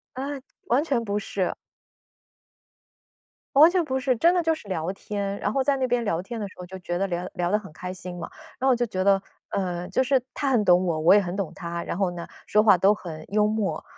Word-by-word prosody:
啊， 265 Hz, +2 st, -4 dB, 0.4 s
完 245 Hz, +5 st, +3 dB
全 265 Hz, -7 st, 0 dB
不 205 Hz, -2 st, -1 dB
是。 195 Hz, -2 st, -2 dB, 2.0 s
完 310 Hz, +4 st, +9 dB
全 360 Hz, -2 st, +1 dB
不 265 Hz, -2 st, -1 dB
是， 255 Hz, 0 st, +1 dB
真 335 Hz, +9 st, +4 dB
的 355 Hz, -, +2 dB
就 325 Hz, -1 st, +2 dB
是 265 Hz, -10 st, -12 dB
聊 175 Hz, -1 st, -2 dB
天。 200 Hz, 0 st, -4 dB
然 205 Hz, -, -1 dB
后 270 Hz, -, +1 dB
在 280 Hz, 0 st, +2 dB
那 260 Hz, -1 st, 0 dB
边 240 Hz, -1 st, +1 dB
聊 175 Hz, -4 st, -1 dB
天 230 Hz, +3 st, -6 dB
的 205 Hz, -, -3 dB
时 -, -, -17 dB
候 180 Hz, -, -8 dB
就 190 Hz, +1 st, -8 dB
觉 175 Hz, -1 st, -4 dB
得 195 Hz, -, +1 dB
聊 175 Hz, 0 st, -3 dB
聊 175 Hz, -1 st, -1 dB
得 210 Hz, -, +3 dB
很 195 Hz, -7 st, -12 dB
开 180 Hz, +2 st, -6 dB
心 180 Hz, -1 st, -8 dB
嘛。 -, -, -6 dB, 0.3 s
然 260 Hz, -, -1 dB
后 -, -, +5 dB
我 250 Hz, -, +4 dB
就 240 Hz, 0 st, 0 dB
觉 185 Hz, -3 st, -2 dB
得， 195 Hz, 0 st, +4 dB, 0.3 s
呃， 180 Hz, -2 st, -2 dB
就 190 Hz, +7 st, +1 dB
是 265 Hz, -1 st, +2 dB
他 275 Hz, -, -1 dB
很 235 Hz, -5 st, +3 dB
懂 180 Hz, 0 st, +4 dB
我， 160 Hz, -2 st, 0 dB
我 165 Hz, +4 st, +6 dB
也 205 Hz, -, +6 dB
很 180 Hz, -2 st, -4 dB
懂 195 Hz, -5 st, -3 dB
他， 170 Hz, -2 st, -5 dB
然 -, -, -4 dB
后 190 Hz, -3 st, +1 dB
呢， 170 Hz, -1 st, -7 dB, 0.2 s
说 210 Hz, 0 st, +4 dB
话 205 Hz, -4 st, +6 dB
都 195 Hz, +4 st, +5 dB
很 160 Hz, -6 st, -8 dB
幽 210 Hz, 0 st, +3 dB
默。 210 Hz, -7 st, -1 dB
200 Hz, 265 characters per minute, -25 LUFS, 180-245 Hz, 2.0 s, 完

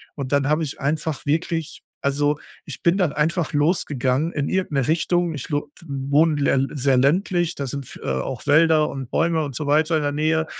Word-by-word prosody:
Und 140 Hz, -2 st, -5 dB
dann 140 Hz, -1 st, +2 dB
habe 155 Hz, +2 st, +2 dB
ich 145 Hz, -, -5 dB
einfach 150 Hz, +1 st, -2 dB
wirklich 165 Hz, +1 st, -1 dB, 0.2 s
also 145 Hz, +1 st, +1 dB, 0.3 s
ich -, -, -8 dB
bin 170 Hz, +3 st, +3 dB
dann 170 Hz, -6 st, +1 dB
einfach 160 Hz, +1 st, 0 dB
losgegangen 145 Hz, -1 st, +1 dB
in 140 Hz, -1 st, -1 dB
irgend 185 Hz, -5 st, -1 dB
'ne 135 Hz, -2 st, +1 dB
Richtung. 175 Hz, +1 st, +1 dB
Ich 140 Hz, -, -6 dB
lo 145 Hz, -1 st, -2 dB, 0.2 s
wohne 145 Hz, +3 st, +2 dB
lä 135 Hz, -1 st, +2 dB
sehr 135 Hz, -1 st, +2 dB
ländlich, 175 Hz, +5 st, +1 dB
da 140 Hz, -, -4 dB
sind 135 Hz, +1 st, -5 dB
F -, -, -12 dB
auch 65 Hz, -, -3 dB
Wälder 155 Hz, +1 st, +4 dB
und 135 Hz, -3 st, -6 dB
Bäume 165 Hz, -1 st, +1 dB
und 140 Hz, -4 st, -6 dB
so 145 Hz, -, -3 dB
weiter 155 Hz, +3 st, +3 dB
in 155 Hz, -, +1 dB
der 145 Hz, -, 0 dB
Nähe 155 Hz, +2 st, +1 dB
150 Hz, 200 wpm, -22 LUFS, 140-160 Hz, 0.3 s, Wälder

